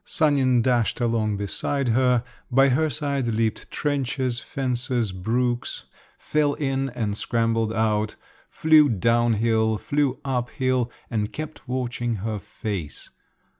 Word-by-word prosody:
Sanin 135 -6 +2
dashed 120 -3 +1
along 115 -3 0
beside 125 +6 -1
her, 125 0 +3 0.3
by 135 +2 +5
her 155 +5 +2
side 140 -4 -1
leaped 110 -1 -1
trenches, 135 -4 -1
fences, 125 -5 -2
brooks, 120 +6 -2 0.3
fell 150 -1 0
in 135 -2 -1
and 105 -4 -1
scrambled 115 0 0
out, 110 -1 0 0.3
flew 155 -2 +5
down 115 +2 +2
hill, 110 0 +2
flew 140 +3 0
up 125 -3 -1
hill, 130 -2 0 0.2
and 105 -2 -1
kept 155 -2 -7
watching 120 -2 -2
her 105 +1 -3
face. 95 -7 -6
120 Hz, 125 wpm, -24 LUFS, 110-135 Hz, 0.3 s, by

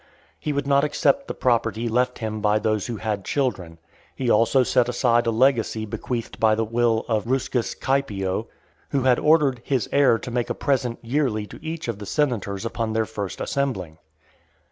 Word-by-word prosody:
He 150 - -2
would 140 -1 -1
not 140 0 +3
accept 275 - +1
the - - -5
property 115 -2 0
left 125 +2 +1
him 110 -2 -4
by 105 +1 +3
those 110 -2 0
who 120 -2 -4
had 105 -2 -3
children. 95 - -2 0.4
He 125 -3 0
also 115 +4 +4
set 125 0 +2
aside 120 -1 +2
a - - +4
legacy 115 -2 +2
bequeathed 115 +2 -5
by 110 -1 +4
the 115 +1 0
will 115 0 +1
of 110 -1 -1
Ruscus 125 -2 -1
Caepio, 110 -6 -1 0.4
who 135 -2 0
had 130 -2 +4
ordered 150 -5 +3
"his 130 -5 0
heir 140 -5 +4
to 120 - -7
make 120 0 -1
a - - -1
present 130 -4 0
yearly 120 -4 0
to - - -13
each 160 -2 -5
of 115 -3 -3
the 105 - -8
senators 115 -8 -1
upon 115 -1 -2
their 110 0 +1
first 105 -3 -5
assembling." 95 - -2
115 Hz, 185 wpm, -23 LUFS, 110-135 Hz, 0.4 s, also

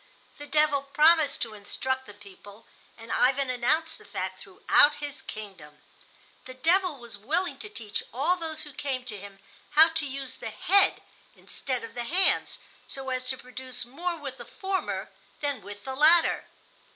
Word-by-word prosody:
The 290 - -8
devil 300 -2 +3
promised 300 +2 +4
to 225 -2 -6
instruct 260 +5 -3
the 205 - -11
people, 205 +1 -15 0.3
and 225 0 -10
Ivan 265 +1 +2
announced 310 +6 +1
the - - -16
fact - - -5
throughout 295 0 +4
his 290 -1 -6
kingdom. 190 -9 -10 0.6
The 255 - -9
devil 340 +3 +2
was 235 -4 -10
willing 320 - -1
to 425 - -8
teach 225 - -4
all 290 +10 +2
those 320 -3 -5
who 295 -2 -11
came 260 -3 -3
to 220 -4 -3
him 200 0 -11 0.4
how 320 +1 +9
to 320 -2 -1
use 270 -1 -5
the - - -6
head 400 0 +3 0.3
instead 255 -4 -4
of 230 - -8
the 240 -1 -4
hands, 365 +8 +3 0.3
so 265 -1 -5
as 255 0 -2
to 260 0 -2
produce 255 -1 -6
more 340 +8 -3
with 275 -4 -7
the - - -9
former 385 -1 -3 0.3
than 285 -2 -2
with 205 0 -10
the 265 - -4
latter. 320 +5 +5
270 Hz, 170 wpm, -27 LUFS, 240-310 Hz, 0.6 s, how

